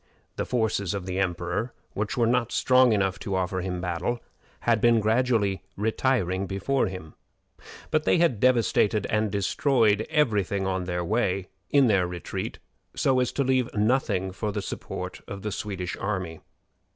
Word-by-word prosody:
The - - -2
forces 110 -5 0
of 95 -2 -4
the 95 0 -3
emperor, 90 +5 -1 0.2
which 105 +3 -3
were 120 - +3
not 120 0 +1
strong 130 -1 +4
enough 95 -4 +1
to 95 - -3
offer 95 0 -1
him 90 -1 -3
battle, 90 +7 -2 0.4
had 115 -2 +2
been 120 -1 +5
gradually 110 -3 +1 0.2
retiring 105 -3 0
before 100 +9 0
him; 90 -5 -8 0.8
but 155 -1 +2
they - - +4
had 165 -11 +2
devastated 115 -4 +3
and 110 0 +1
destroyed 110 +1 +2
every 140 -11 +2
thing 95 +1 -2
on 95 -1 -1
their 90 -1 -2
way, 95 -3 0 0.2
in 140 -2 +5
their 95 -6 +3
retreat, 90 -1 -5 0.4
so 130 -1 +2
as 125 -1 +1
to 140 - +1
leave 130 -2 +1
nothing 105 -4 +1
for 105 +3 -3
the 105 0 -3
support - - -6
of 100 -1 -7
the 105 - -2
Swedish 95 -3 -4
army. 95 -5 -3
105 Hz, 165 wpm, -26 LUFS, 95-120 Hz, 0.8 s, been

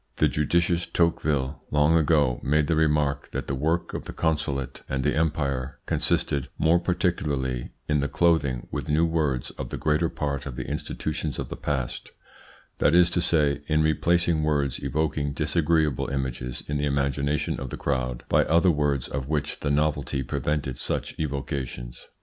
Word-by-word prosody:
The - - +3
judicious 85 +2 +1
Tocqueville 75 -4 0
long 75 +2 +3
ago 75 -5 +3
made 75 +2 +2
the 80 - +1
remark 75 -3 +1
that - - -3
the 65 - -3
work 80 +6 0
of - - -4
the - - -7
consulate 70 -5 -1
and 65 0 -1
the 75 - +2
empire 70 -4 -1
consisted 70 -2 0
more 85 +2 +4
particularly 80 -8 -1 0.2
in 75 -1 +2
the 70 - 0
clothing 70 -7 +1
with - - -4
new 80 +3 +3
words 75 -7 0
of - - -4
the - - -4
greater 75 +2 +1
part 70 -1 -3
of 65 - -6
the 65 0 -4
institutions - - -3
of - - -4
the - - -4
past 65 -4 -3 0.7
that 75 - +4
is 90 0 +6
to 90 - +1
say, 75 -4 +2
in 75 0 +3
replacing 85 +1 +2
words 75 -4 0
evoking 75 -2 -1
disagreeable 80 -2 +1
images 65 -2 -3
in 75 - -1
the 75 - +1
imagination 70 +1 0
of 65 - -5
the - - -5
crowd 65 -3 -2
by - - +4
other 85 +3 +4
words 75 -4 0
of 65 -1 -4
which 75 -1 -1
the - - -2
novelty 70 -2 0
prevented 70 0 -2
such - - -2
evocations. 65 -4 -4
75 Hz, 165 wpm, -26 LUFS, 70-80 Hz, 0.7 s, is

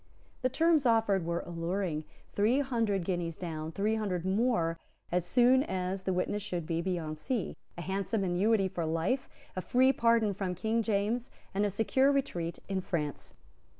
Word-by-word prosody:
The 255 - +2
terms 315 0 +3
offered 220 -6 +3
were 170 0 0
alluring; 170 -2 -2 0.3
three 220 +7 +3
hundred 225 -8 0
guineas 175 -3 -2
down, 160 -2 -5
three 205 +5 0
hundred 185 -5 -2
more 190 -5 +1 0.3
as 175 0 0
soon 250 +3 +5
as 190 -5 -2
the 190 - -1
witness 185 +3 -1
should 175 -4 -3
be 165 +1 -1
beyond 165 -4 -3
sea, 240 - -2 0.2
a 175 - -4
handsome 195 +3 -1
annuity 195 +3 +2
for 175 -2 -3
life, 165 +12 0 0.3
a 185 - -2
free 260 +6 +4
pardon 230 -4 +3
from 185 -2 -3
King 220 +5 0
James, 220 +3 0 0.2
and 205 +2 +2
a - - -1
secure 245 +7 +3
retreat 175 -12 -1
in 195 -1 -1
France. 155 -5 -3
195 Hz, 165 wpm, -31 LUFS, 175-230 Hz, 0.3 s, soon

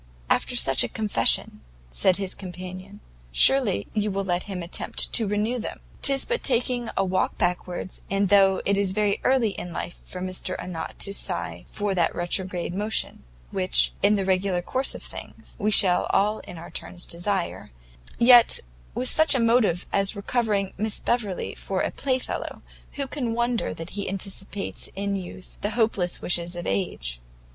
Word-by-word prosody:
"After - - +1
such 135 0 +4
a - - 0
confession," 205 - +1 0.3
said 120 - +3
his 195 -2 -3
companion, 185 +2 -9 0.3
"surely 215 - +5
you 210 -1 0
will 195 0 -1
let 175 -1 0
him 180 -3 -4
attempt 170 - +1
to 225 -3 +5
renew 210 +5 0
them? 220 - -5 0.2
'tis 275 -1 +2
but 480 +1 -1
taking 245 -2 +1
a 195 - +3
walk 185 0 0
backwards; 180 +1 -2
and 195 0 +1
though 195 -1 +5
it 200 0 +2
is 195 -2 0
very 210 0 +1
early 255 -4 +3
in 180 - -7
life 175 - -5
for 180 - -8
Mr 185 0 -4
Arnott 170 -3 -6
to 200 - -1
sigh 90 - -4
for 205 -1 -2
that 175 -3 +1
retrograde 175 0 -2
motion, 210 +3 -2 0.3
which, - - +3
in 210 - +5
the 195 -2 -1
regular 185 -1 +1
course 260 +7 -2
of - - -8
things, - - -10
we 210 - +1
shall 185 -4 +5
all 210 +2 +2
in 180 -3 -10
our 165 - -10
turns 180 -1 -7
desire, 180 +1 -3 0.5
yet 240 0 +7 0.4
with 130 - +1
such 315 -2 +4
a - - +2
motive 230 -7 +3
as 195 +1 +1
recovering 205 -2 0
Miss 215 0 -1
Beverley 215 -6 -1
for 190 -1 -3
a - - -1
playfellow, 260 -2 -3 0.3
who 280 - -2
can 255 -4 -3
wonder 235 0 0
that 165 +1 -7
he 200 0 -3
anticipates 195 +1 -4
in 200 +1 -1
youth 185 -1 -8
the 205 - 0
hopeless 205 -6 +1
wishes 175 0 0
of 175 - -5
age?" - - -2
195 Hz, 170 wpm, -25 LUFS, 180-220 Hz, 0.5 s, yet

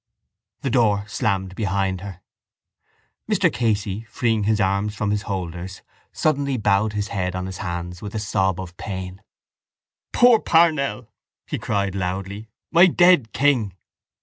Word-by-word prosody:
The 135 - -2
door 105 -5 +2
slammed 95 -3 -1
behind 95 -2 -1
her. 95 -2 -9 1.1
Mr - - +2
Casey, 105 -4 -1
freeing 115 -5 0
his 110 0 +2
arms 100 +2 0
from 110 -2 -1
his 105 0 0
holders, 90 -1 -5 0.3
suddenly 140 -3 0
bowed 105 0 +1
his 105 0 -2
head 90 -2 -2
on 90 0 -3
his 95 0 -7
hands 90 -2 -5
with 105 +1 -7
a - - -1
sob 95 -3 0
of 90 -1 -7
pain. 95 -1 -6 0.9
—Poor 245 -2 +6
Parnell! 155 - +2 0.4
he - - -4
cried 100 -2 -1
loudly. 100 +3 -4 0.2
My 175 +2 +7
dead 175 -9 +4
king! 125 -9 +1
100 Hz, 140 wpm, -22 LUFS, 95-115 Hz, 1.1 s, My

